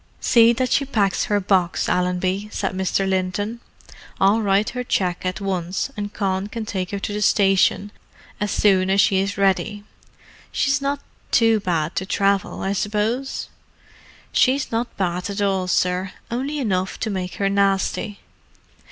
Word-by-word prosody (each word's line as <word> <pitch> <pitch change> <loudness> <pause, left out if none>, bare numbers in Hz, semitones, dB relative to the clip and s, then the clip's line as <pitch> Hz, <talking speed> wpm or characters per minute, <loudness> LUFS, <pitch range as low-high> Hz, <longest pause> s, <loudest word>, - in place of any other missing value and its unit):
"See 230 -1 +5
that 255 +1 -1
she 280 - +3
packs 210 -8 0
her 205 -1 +1
box, 185 -2 +1
Allenby," 180 +3 0
said - - -2
Mr. 190 +1 0
Linton. 190 +4 -1 0.6
"I'll 205 +4 +4
write 200 0 +2
her 250 0 -4
cheque 185 -6 -1
at 185 - -3
once, 190 +4 -2
and 205 -1 -4
Con 195 -1 -1
can 220 +1 -5
take 185 -3 -3
her 200 - -3
to 200 +1 -4
the 210 - -3
station 195 0 +3 0.5
as 210 0 -1
soon 190 -3 +3
as 195 +1 +3
she 190 -1 +4
is 195 0 -2
ready. 200 +1 +1 0.7
She's 280 0 +1
not 280 +1 -1 0.3
too 225 -2 +4
bad 170 -5 -1
to 190 - -2
travel, 200 0 0
I 195 - 0
suppose?" 215 +6 -2 0.8
"She's 265 +2 +2
not 230 +1 -2
bad 180 0 -1
at 200 +1 -4
all, 195 -2 0
sir. 180 +1 0 0.2
Only 270 +5 -2
enough 190 -8 -1
to 220 - -1
make 185 -2 -4
her 200 - 0
nasty." 200 +1 0
200 Hz, 160 wpm, -22 LUFS, 190-215 Hz, 0.8 s, See